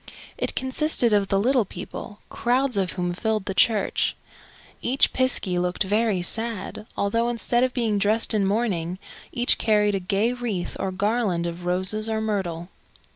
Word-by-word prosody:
It - - -4
consisted 260 -3 +2
of 200 -1 +2
the 195 - +1
little 250 +3 +3
people, 200 +3 -8
crowds 250 +1 0
of 190 -2 0
whom 175 -1 -2
filled 215 +1 -1
the 195 - -3
church. 215 +1 +2 0.7
Each 260 +3 +3
piskie 225 -8 +1
looked 180 +3 -1
very 205 -1 +1
sad, 220 0 -2
although, 230 +4 +1
instead 240 +1 0
of 255 - +1
being 225 -5 0
dressed 215 +3 +2
in 210 -2 +2
mourning, 190 -5 -1 0.3
each 240 0 +2
carried 210 -2 +2
a 195 - 0
gay 200 +5 0
wreath 225 -8 -4
or 190 - -2
garland 200 -2 0
of 170 +1 -5
roses 190 +5 +1
or 220 0 -1
myrtle. 190 -6 -3
210 Hz, 160 wpm, -24 LUFS, 190-235 Hz, 0.7 s, little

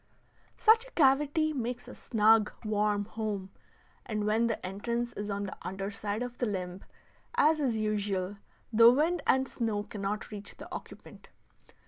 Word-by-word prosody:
Such 455 +2 +5
a - - -16
cavity 295 +2 +3
makes 245 -2 -4
a - - -9
snug, 220 -1 +3
warm 210 -1 +1
home, 205 -3 -4 0.5
and 215 -2 -2
when 220 +2 +2
the 230 - -3
entrance 235 +5 -3
is 205 0 -5
on 200 0 -2
the 195 - -5
under 195 +2 -4
side 210 +2 -3
if 245 0 -7
the 245 - +1
limb, 185 -2 -4 0.5
as 320 -9 +4
is 255 -6 +1
usual, 205 -2 -1 0.4
the 230 +1 +9
wind 315 +7 +2
and 265 +1 +3
snow 220 -5 -2
cannot 210 +1 -4
reach 205 -1 -6
the - - -9
occupant. - - -10
215 Hz, 155 wpm, -30 LUFS, 205-245 Hz, 0.5 s, the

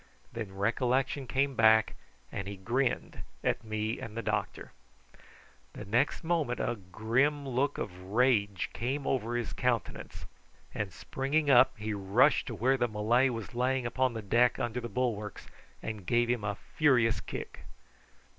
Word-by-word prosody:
Then 105 -5 -6
recollection 130 +6 0
came 135 +2 +1
back, 110 -2 +5 0.4
and 100 - -4
he 100 - -5
grinned 120 +6 -1 0.2
at - - 0
me 110 +1 -2
and 110 0 -7
the 115 - -3
doctor. - - -3 1.0
The 105 - -8
next 120 - +1
moment 160 -7 0
a 120 - 0 0.2
grim 135 +7 +1
look 135 +3 0
of 90 -2 -5
rage 105 -3 +1
came 135 +4 -2
over 120 -2 -1
his 120 -2 -2
countenance, 125 -3 -2 0.5
and 105 -2 -3
springing 140 - 0
up 130 0 +6
he 105 0 -3
rushed 105 +8 +3
to 115 - -4
where 130 +6 +2
the 120 -1 +1
Malay 115 +4 +2
was 115 -1 -5
lying 125 +1 0
upon 130 +1 +1
the 110 - -4
deck 120 +5 +3
under 120 0 -2
the 120 - -5
bulwarks, 110 -3 -2 0.4
and 105 -5 -6
gave 120 0 +2
him 120 -3 -1
a 100 -1 -2 0.2
furious 125 -7 +4
kick. - - -7
120 Hz, 155 wpm, -30 LUFS, 110-130 Hz, 1.0 s, up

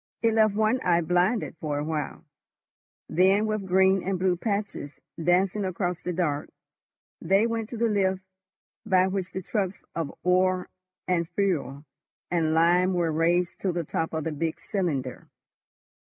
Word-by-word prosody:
It 225 -1 +3
left 215 -2 +3
one 220 +4 +2
eye 175 -1 +3
blinded 180 +4 +1
for 150 -2 -2
a 145 - -1
while. 155 +1 -4 0.8
Then, 190 +5 +3
with 215 -3 -2
green 190 +1 +4
and 190 +1 -1
blue 180 0 +2
patches 200 - -3 0.2
dancing 185 +4 +2
across 180 -1 -2
the 180 - -3
dark, 155 -5 -1 0.7
they 195 +6 +3
went 230 -1 -2
to 240 - -6
the 235 - +1
lift 190 -3 0 0.6
by 185 -1 +3
which 190 -1 -3
the 190 - -5
trucks 195 -1 -3
of 165 -4 -2
ore 185 0 +2 0.4
and 170 -2 0
fuel 155 -7 -1 0.5
and 160 -2 +1
lime 175 +3 +4
were 170 -2 +1
raised 170 +3 +1
to 190 - 0
the 170 -1 -2
top 165 +2 -2
of 160 -1 -2
the 160 - -2
big 160 +2 -3
cylinder. 145 - -3
180 Hz, 155 wpm, -26 LUFS, 165-195 Hz, 0.8 s, green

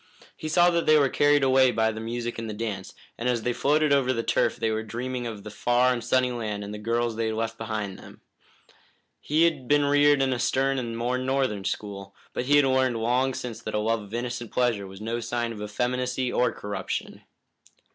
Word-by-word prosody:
He 155 - -6
saw 175 +2 +5
that 170 -1 0
they 155 0 +7
were 140 -2 +3
carried 145 +1 +3
away 130 -1 +5
by 110 -1 +1
the 110 - -7
music 120 +1 -4
and 115 -1 -5
the 105 - -5
dance, 105 -4 -5 0.2
and 120 +2 0
as 120 -3 0
they 125 - 0
floated 150 +3 +2
over 135 -2 +3
the 115 -2 -2
turf - - +1
they 110 - -1
were 110 0 -1
dreaming 120 +2 -4
of 105 -3 -7
their 105 - -8
far 125 +1 +2
and 120 -2 -4
sunny 125 +1 +2
land 110 -4 -4
and 100 +1 -7
the 105 - -6
girls 115 +1 -1
they 115 -1 0
had 110 - -2
left 115 0 -2
behind 110 -3 -4
them. - - -14 1.0
He 155 +3 +2
had 150 -7 +1
been 145 +1 +3
reared 145 -1 +4
in 130 -1 +1
a 125 - -3
stern 135 +2 +1
and 115 -2 -4
more 125 +2 -1
northern 130 -6 -1
school, 100 -2 -5 0.2
but 125 - -2
he 145 +3 +4
had 145 -1 +6
learned 130 -2 +2
long 125 +3 +1
since 120 -3 -6
that 110 - -5
a - - +2
love 110 +1 0
of 105 +1 -12
innocent 120 -1 -4
pleasure 115 -6 0
was 95 +1 -11
no 115 +2 -2
sign 120 0 -2
of 105 -2 -8
effeminacy 125 +4 -1
or 125 - +2
corruption. 105 0 -5
120 Hz, 225 wpm, -26 LUFS, 110-130 Hz, 1.0 s, they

